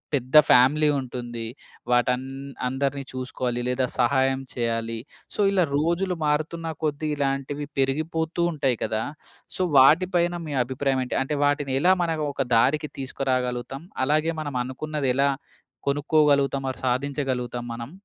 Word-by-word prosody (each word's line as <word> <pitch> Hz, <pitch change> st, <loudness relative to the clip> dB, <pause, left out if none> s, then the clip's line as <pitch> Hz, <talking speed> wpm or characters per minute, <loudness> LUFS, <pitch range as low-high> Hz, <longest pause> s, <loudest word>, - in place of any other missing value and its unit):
పెద్ద 130 Hz, +3 st, +2 dB
ఫ్యామిలీ 145 Hz, +5 st, +5 dB
ఉంటుంది. 120 Hz, -3 st, -5 dB, 0.5 s
వాటన్ 125 Hz, +1 st, +2 dB, 0.4 s
అందరిని 140 Hz, +1 st, -1 dB
చూసుకోవాలి 125 Hz, -1 st, -3 dB
లేదా 125 Hz, +1 st, +1 dB
సహాయం 130 Hz, +1 st, +2 dB
చేయాలి. 115 Hz, -1 st, -2 dB, 0.4 s
సో, -, -, -10 dB
ఇలా 190 Hz, -2 st, +3 dB
రోజులు 170 Hz, +4 st, 0 dB
మారుతున్న 155 Hz, +3 st, -1 dB, 0.2 s
కొద్దీ 155 Hz, 0 st, -1 dB
ఇలాంటివి 140 Hz, +1 st, -2 dB
పెరిగిపోతూ 160 Hz, +5 st, 0 dB
ఉంటాయి 140 Hz, -5 st, 0 dB
కదా! 110 Hz, 0 st, -1 dB, 0.5 s
సో, -, -, -3 dB, 0.2 s
వాటి 155 Hz, +8 st, +7 dB
పైన 175 Hz, 0 st, +2 dB
మీ 145 Hz, -, -4 dB
అభిప్రాయమేంటి? 130 Hz, 0 st, -1 dB
అంటే 145 Hz, +2 st, -3 dB
వాటిని 145 Hz, -2 st, 0 dB
ఎలా 180 Hz, +5 st, +5 dB
మనం 160 Hz, -2 st, -1 dB
ఒక 135 Hz, -2 st, -2 dB
దారికి 145 Hz, +6 st, +2 dB
తీసుకురాగలుగుతాం? 130 Hz, 0 st, -2 dB, 0.2 s
అలాగే 155 Hz, +3 st, +1 dB
మనం 145 Hz, -3 st, -5 dB
అనుకున్నది 140 Hz, +2 st, -3 dB
ఎలా 140 Hz, +1 st, +3 dB, 0.6 s
కొనుక్కోగలుగుతాం, 140 Hz, -2 st, +2 dB
ఆర్ -, -, -11 dB
సాధించగలుగుతాం 125 Hz, -2 st, -2 dB
మనం? 115 Hz, +3 st, -7 dB
135 Hz, 125 wpm, -25 LUFS, 125-150 Hz, 0.6 s, వాటి